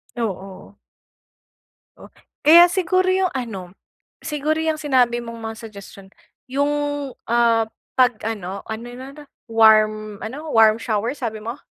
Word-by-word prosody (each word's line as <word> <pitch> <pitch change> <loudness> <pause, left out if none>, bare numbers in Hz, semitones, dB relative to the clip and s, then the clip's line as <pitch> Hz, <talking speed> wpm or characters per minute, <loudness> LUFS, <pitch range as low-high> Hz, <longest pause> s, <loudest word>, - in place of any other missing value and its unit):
Oo. 195 -4 -6 1.2
Oh, - - -12 0.4
kaya 345 +3 +8
siguro 370 0 +1
'yong 375 -1 +1
ano, 195 -8 -6 0.5
siguro 300 0 -1
'yong 315 -1 -1
sinabi 255 -5 +2
mong 230 -1 -8
mga - - -10
suggestion. 200 -2 -13 0.4
'Yong, 285 +3 0 0.6
ah, 230 -1 +2 0.3
pag-ano, 215 -6 0
ano 220 +2 -7
no, 260 - -9
no, 295 +1 -13 0.3
warm 215 -1 +4
ano, 285 +8 -7
warm 220 0 +5
shower 225 +1 -1
sabi 225 -6 -5
mo? 235 +5 -6
230 Hz, 120 wpm, -21 LUFS, 215-285 Hz, 1.2 s, kaya